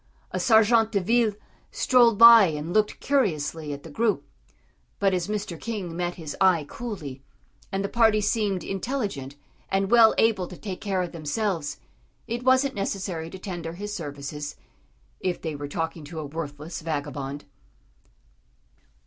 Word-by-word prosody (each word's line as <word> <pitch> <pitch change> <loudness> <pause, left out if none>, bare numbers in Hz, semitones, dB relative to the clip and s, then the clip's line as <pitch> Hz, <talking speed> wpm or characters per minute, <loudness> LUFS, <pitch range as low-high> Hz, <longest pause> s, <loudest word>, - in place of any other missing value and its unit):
A - - -2
sergent 225 -1 +4
de 200 - +2
ville 225 +3 +2 0.4
strolled 240 -4 +4
by 230 -1 +10
and 155 0 -3
looked 215 -1 +1
curiously 160 - 0
at 145 0 -6
the 165 - -10
group, 210 -4 0 0.7
but 195 -1 +2
as 180 -1 -1
Mr. 205 -6 -4
King 200 -7 -4
met 175 0 -2
his 160 -5 -7
eye 180 -5 +4
coolly, 155 - -7 0.5
and 195 0 -1
the - - 0
party 225 -1 +3
seemed 205 -4 0
intelligent 195 - -3 0.3
and 195 +1 0
well 230 -2 +7
able 210 -5 +2
to 180 - -10
take 190 -4 -6
care 195 -3 0
of 175 - -5
themselves, 165 0 -2 0.5
it 235 +1 -3
wasn't 260 +1 +3
necessary 190 -5 -3
to 190 - -8
tender 175 -4 -6
his 205 +4 -6
services 145 -2 -6 0.6
if 180 -1 -2
they 160 -3 -4
were 145 0 -5
talking 160 +2 -4
to 160 +3 -9
a 155 - -4
worthless 150 +2 -6
vagabond. 145 -2 -4
185 Hz, 150 wpm, -25 LUFS, 155-215 Hz, 0.7 s, by